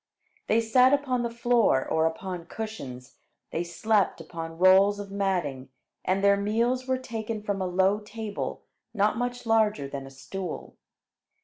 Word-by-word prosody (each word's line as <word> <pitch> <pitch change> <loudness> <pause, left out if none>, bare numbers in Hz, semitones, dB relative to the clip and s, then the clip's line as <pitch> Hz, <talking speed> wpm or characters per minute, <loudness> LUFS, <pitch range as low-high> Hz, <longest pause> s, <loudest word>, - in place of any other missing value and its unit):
They 225 +2 +3
sat 250 +4 +5
upon 270 -3 +1
the 235 - -1
floor 235 - +2
or 160 0 +2
upon 175 +1 -5
cushions; 135 - -7 0.3
they 170 - -1
slept 200 +3 +1
upon 165 0 -7
rolls 190 +3 +6
of 200 -1 -7
matting, 175 -10 -1 0.3
and 190 +1 0
their 200 0 +5
meals 235 +5 0
were 260 0 +1
taken 225 -3 -5
from 200 -2 -2
a 185 - 0
low 190 +3 +2
table 215 0 -5 0.3
not 210 +1 +2
much 245 0 -3
larger 215 -10 +2
than 135 -1 -6
a - - -9
stool. 180 +7 -7
200 Hz, 150 wpm, -27 LUFS, 175-225 Hz, 0.3 s, rolls